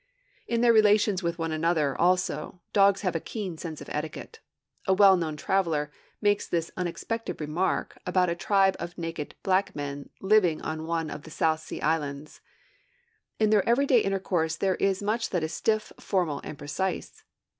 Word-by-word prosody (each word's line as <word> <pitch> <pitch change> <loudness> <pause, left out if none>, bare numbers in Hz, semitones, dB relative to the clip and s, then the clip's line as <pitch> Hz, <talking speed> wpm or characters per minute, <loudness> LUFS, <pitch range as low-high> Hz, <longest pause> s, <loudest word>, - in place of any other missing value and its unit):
In 235 0 0
their 240 -1 +6
relations 210 -3 +4
with 170 -1 -2
one 165 -1 -2
another, 155 -3 +1
also, 180 -2 0
dogs 200 -1 +4
have 185 -5 -1
a - - +1
keen 195 -1 -5
sense 160 -3 -6
of - - -9
etiquette. 155 - -5 0.5
A 190 - +4
well 195 -1 +7
known 160 -4 -2
traveler 160 -4 0 0.3
makes 205 -1 +2
this 165 -1 -1
unexpected 190 +6 -4
remark 155 +5 -1
about 180 0 +2
a 170 - +1
tribe 195 +2 +2
of 175 +1 -6
naked 165 -3 -5
black 190 0 +1
men, 145 -1 -5
living 190 -5 +3
on 160 0 -4
one 165 -1 -1
of - - -6
the 160 - -12
South 155 0 +1
Sea - - -7
Islands: 150 -2 -2 1.0
'In 215 -1 +2
their 210 0 +3
everyday 255 +1 +4
intercourse 190 -5 0
there 190 -1 +1
is 195 0 0
much 225 +3 0
that 180 -4 -1
is 160 +1 -3
stiff, 215 +4 0
formal, 175 -7 -1
and 150 - -7
precise.' 175 +7 -4
180 Hz, 170 wpm, -27 LUFS, 160-200 Hz, 1.0 s, well